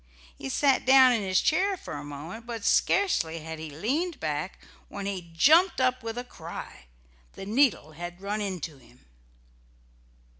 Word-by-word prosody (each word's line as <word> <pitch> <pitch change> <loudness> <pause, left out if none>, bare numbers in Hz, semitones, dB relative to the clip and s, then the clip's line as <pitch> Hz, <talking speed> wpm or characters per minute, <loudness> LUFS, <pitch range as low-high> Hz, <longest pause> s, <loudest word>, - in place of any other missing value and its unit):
He 135 - -7
sat 275 - +2
down 260 -1 +7
in 230 -3 +1
his 185 -2 +2
chair 380 +4 +1
for - - -9
a 145 0 -6
moment, 155 +11 -8
but 230 -3 -5
scarcely 165 - +2
had 160 0 -7
he 160 0 -6
leaned 280 - -2
back, 155 +3 -3 0.3
when 200 -1 -7
he 185 -4 -5
jumped 330 - +5
up 255 0 +1
with 225 0 -5
a 245 - -3
cry. 155 - -9 0.5
The - - -8
needle 220 - +2
had 175 +3 -8
run 205 +2 -3
into 170 -7 -5
him. 65 - -22
200 Hz, 160 wpm, -27 LUFS, 160-255 Hz, 0.5 s, down